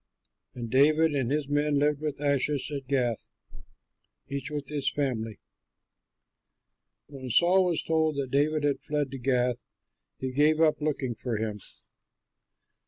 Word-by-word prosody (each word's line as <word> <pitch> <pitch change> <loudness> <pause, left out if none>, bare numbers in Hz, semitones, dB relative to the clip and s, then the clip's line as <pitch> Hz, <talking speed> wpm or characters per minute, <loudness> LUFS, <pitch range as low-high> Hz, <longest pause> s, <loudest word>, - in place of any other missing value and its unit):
And 120 -2 -6
David 155 +4 +4
and 130 -4 0
his 145 0 -1
men 145 0 +1
lived 145 0 +1
with 150 -2 -3
Achish 145 0 0
at 140 -2 -5
Gath, 125 -4 -1 1.0
each 140 +1 -4
with 145 -2 -5
his 145 -2 0
family. 115 -7 -2 1.7
When 135 -3 -9
Saul 180 +8 +4
was 170 -3 -1
told 160 -1 +1
that 135 -2 -3
David 150 +2 +1
had 145 -1 +1
fled 145 -3 -2
to 135 - -6
Gath, 125 -1 0 0.5
he 130 0 -4
gave 150 +4 +3
up 155 -1 +3
looking 140 -5 -1
for 115 0 -3
him. 105 -1 -3
140 Hz, 140 wpm, -28 LUFS, 130-150 Hz, 1.7 s, David